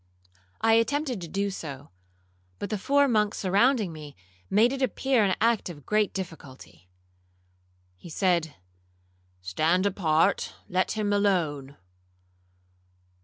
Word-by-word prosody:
I 225 0 +4
attempted 250 0 +1
to 170 - -6
do 200 +4 -2
so; 145 - -8 0.7
but 200 - -5
the 210 - -1
four 285 +6 +3
monks 215 -4 +1
surrounding 205 0 +2
me, 150 -2 -10 0.3
made 230 +5 +4
it 275 - -4
appear 260 -2 +1
an 190 -3 +2
act 230 -3 +1
of 145 -5 -11
great 210 -1 +1
difficulty. 135 - -9 1.1
He 170 - -12
said, 170 -2 0 0.9
'Stand 160 - +1
apart—let 185 +1 0
him 210 -2 -1
alone.' 160 -9 0
195 Hz, 115 wpm, -26 LUFS, 160-220 Hz, 1.1 s, I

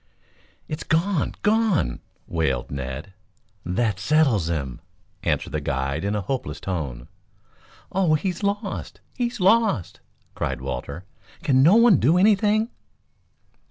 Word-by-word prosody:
"It's 155 0 -5
gone 165 +1 0
gone!" 210 - +2 0.3
wailed 80 -7 -1
Ned. 70 +7 -5 0.5
"That 100 +2 0
settles 120 - +2
him," 70 -7 -3 0.4
answered - - -1
the - - -2
guide 70 +3 -2
in 100 +1 -1
a 105 - -1
hopeless 130 +7 -4
tone. 70 -10 -4 0.8
"Oh, 180 -5 +3
he's 180 +4 -2
lost, 200 0 -3 0.2
he's 240 -1 -2
lost!" 200 - +2 0.3
cried - - -3
Walter. 70 +8 -5 0.4
"Can 130 -2 +4
no 165 +9 +6
one 230 -6 +6
do 155 +9 +4
anything?" 215 +3 +3
140 Hz, 120 wpm, -24 LUFS, -, 0.8 s, no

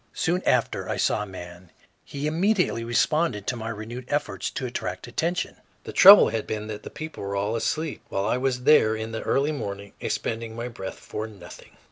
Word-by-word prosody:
Soon 180 +2 0
after 125 -2 +1
I - - -1
saw - - +1
a - - -3
man; 90 -1 -10 0.3
he 140 +1 -5
immediately 175 - +1
responded 120 -1 +1
to 125 - -1
my 115 -1 -5
renewed 115 +3 -6
efforts 110 -11 -2
to 130 - -4
attract 95 -7 -4
attention. 165 +9 -2 0.3
The - - -8
trouble 200 +2 +10
had 110 0 -3
been 105 -1 -3
that 105 -1 -5
the - - -8
people 155 +1 -8
were 100 0 -3
all 105 +3 -1
asleep, 155 +6 -2
while 100 0 -1
I 110 - +1
was 125 -1 -1
there 110 -7 +5
in 110 0 -5
the 110 - -4
early 140 +3 +1
morning 100 -7 -5
expending 115 0 -3
my 120 +1 -4
breath 95 -5 -7
for 110 +1 -5
nothing. 100 -5 -13
115 Hz, 195 wpm, -25 LUFS, 105-145 Hz, 0.3 s, trouble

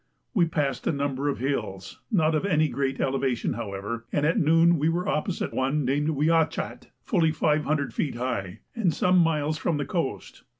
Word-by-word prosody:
We 185 -7 +4
passed 145 -4 -1
a - - +3
number 140 -1 -1
of 140 - -2
hills, 105 -8 -3
not 160 -6 +3
of 155 - +1
any 155 -6 +2
great 135 -1 -2
elevation 130 -2 0
however, 115 +1 -5
and 145 - +1
at 165 +7 +2
noon 165 0 +4
we 155 +3 +2
were 175 +2 -1
opposite 160 +4 -1
one 135 +2 0
named 145 +4 +1
Wiachat, 160 +2 0 0.2
fully 165 -7 +2
500 150 -1 0
feet 145 - -2
high, 120 -7 -3
and 210 -7 +2
some 180 +3 +3
miles 155 -2 +1
from 160 -1 0
the 145 - -2
coast. 130 - -4
150 Hz, 175 wpm, -26 LUFS, 135-165 Hz, 0.2 s, We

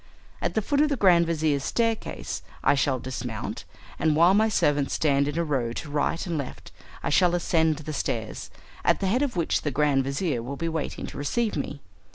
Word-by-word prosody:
At - - -1
the 220 - +1
foot 285 +5 +2
of 305 - +3
the 285 - +1
grand 175 -5 +5
vizir's 155 -4 +1
staircase 230 +3 -2 0.2
I - - +5
shall 135 -1 +1
dismount, 125 -3 -5 0.3
and 155 -1 +2
while 170 +4 +6
my 220 +2 +4
servants 145 -8 +1
stand 140 -2 +2
in 145 +2 -3
a 170 - +2
row 130 -7 -1
to 145 - -6
right 150 +3 0
and 170 -4 -2
left 140 - -7 0.3
I - - -1
shall 175 -2 +4
ascend 160 -2 +2
the 155 0 -6
stairs, 110 -6 -3 0.3
at - - +3
the - - -1
head 225 +8 +2
of 285 -6 -1
which 170 -2 +1
the 150 - -1
grand 140 -1 +2
vizir 140 -2 -1
will 135 +4 -6
be 165 - -2
waiting 160 -2 -3
to - - -8
receive 215 +10 0
me. 140 -1 -4
155 Hz, 210 wpm, -26 LUFS, 140-180 Hz, 0.3 s, while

